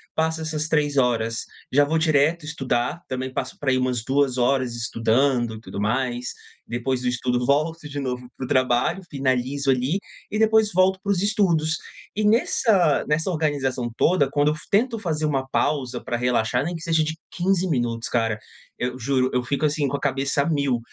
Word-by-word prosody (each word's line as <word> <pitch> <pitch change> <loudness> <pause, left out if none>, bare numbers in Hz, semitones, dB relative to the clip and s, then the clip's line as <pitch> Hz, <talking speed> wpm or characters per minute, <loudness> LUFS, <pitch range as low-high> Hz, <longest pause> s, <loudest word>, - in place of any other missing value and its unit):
Passo 160 0 0
essas 155 -1 -2
3 145 -2 +1
horas, 115 -3 +1 0.3
já 145 +2 +5
vou 160 +2 0
direto 155 +1 +2
estudar. 135 +1 -1
Também 130 0 -3
passo - - -4
por 145 - -1
aí 130 - +3
umas 125 -3 0
2 135 -1 +1
horas 125 -1 +1
estudando 120 +1 +1
e - - -9
tudo 100 - -7
mais. 120 +3 -1 0.4
Depois 125 +2 -2
do 125 - -2
estudo, 125 0 0
volto 155 +3 0
de 145 0 -5
novo 125 -2 -4
pro 130 - -4
trabalho. 130 +8 +2
Finalizo 135 0 0
ali. 130 +8 +1 0.3
E 215 - -1
depois 220 -1 +4
volto 185 +1 +3
pros 200 -3 +1
estudos. 175 -7 +2 0.4
E 215 - 0
nessa 215 - +3
nessa 160 +5 +1
organização 135 -6 -1
toda, 150 -6 +3
quando 145 +1 +3
eu 155 - 0
fa 155 - -11
tento 230 +2 +2
fazer 155 -5 -1
uma 135 -3 0
pausa 135 -2 -1
pra 120 - -2
relaxar, 125 +1 +1
nem 175 - -3
que 165 - -7
seja 165 -2 +2
de 160 +1 -3 0.2
15 185 +1 +1
minutos, 120 -4 -1
cara. 115 -3 0 0.4
Eu 125 +1 -3
juro, 130 +1 +1
eu 125 0 +1
fico, 140 +4 -1
assim, 145 -1 +1
com 140 - -1
a - - -9
cabeça 140 0 0
a 165 - 0
mil. 140 -5 +1
140 Hz, 185 wpm, -23 LUFS, 125-160 Hz, 0.4 s, já